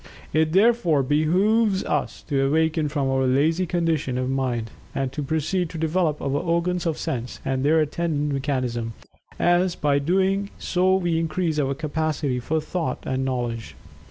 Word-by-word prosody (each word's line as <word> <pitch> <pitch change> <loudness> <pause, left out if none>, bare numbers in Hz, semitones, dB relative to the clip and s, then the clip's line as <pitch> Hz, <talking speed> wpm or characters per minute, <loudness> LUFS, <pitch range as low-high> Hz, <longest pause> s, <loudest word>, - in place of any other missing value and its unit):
It 155 +1 +2
therefore 195 - +4
behooves 190 - +2
us 120 -9 -2
to 135 -1 +1
awaken 160 +1 +1
from 145 -2 -1
our 135 0 +1
"lazy" 160 +8 +2
condition 160 -7 0
of 130 +1 -1
mind, 125 -4 -1 0.2
and 135 -2 -1
to 150 - -4
proceed 160 +4 -1
to 165 - -7
develop 160 -1 0
our - - -1
organs 170 +5 0
of 160 - -1
sense, 125 -1 -4
and 135 -1 0
their 155 +3 +4
attendant 150 -1 -1
mechanism, 125 -4 -2 0.5
as 175 +1 +3
by 145 -1 +1
doing 190 +6 +1
so 185 +1 +2
we 175 -3 +1
increase 165 -1 -1
our 135 -1 0
capacity 155 -3 -1
for 155 +6 -1
thought 155 -3 -3
and 130 0 -1
knowledge. 120 -3 -3
155 Hz, 155 wpm, -24 LUFS, 135-170 Hz, 0.5 s, therefore